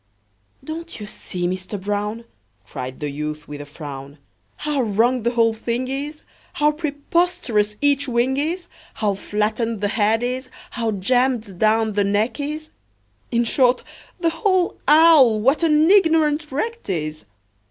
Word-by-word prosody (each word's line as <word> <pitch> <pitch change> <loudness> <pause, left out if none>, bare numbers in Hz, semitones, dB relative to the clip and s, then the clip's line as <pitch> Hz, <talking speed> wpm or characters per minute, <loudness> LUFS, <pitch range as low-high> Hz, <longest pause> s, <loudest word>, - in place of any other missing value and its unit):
"Don't 325 +1 -7
you 210 - -6
see, 180 -4 -4
Mister 185 +3 -3
Brown," 205 +3 -3 0.4
Cried 125 +3 -7
the 150 -1 -3
youth, 150 +1 -5
with 145 0 -7
a 145 - -9
frown, 140 -1 -9 0.4
"How 295 -2 -1
wrong 235 +3 +2
the 235 - +1
whole 230 -1 +3
thing 235 +3 -3
is, 290 +3 -5 0.3
How 300 0 +3
preposterous 295 - 0
each 285 -1 +2
wing 245 +2 +1
is, 335 +5 -2 0.3
How 210 -2 0
flattened 215 +3 -1
the 205 0 0
head 220 +2 +2
is, 255 +1 -3 0.2
how 230 -2 -2
jammed 230 -1 0
down 220 0 +2
the 205 0 +2
neck 210 +6 0
is 305 +2 -4 0.6
In 235 0 +2
short, 250 +1 +2 0.4
the 335 -1 +1
whole 360 +2 +1
owl, 300 -7 +7
what 270 +9 +2
an 315 +1 +4
ignorant 320 -6 +3
wreck 460 - -2
't - - -4
is! 155 -5 -4
235 Hz, 150 wpm, -21 LUFS, 205-300 Hz, 0.6 s, owl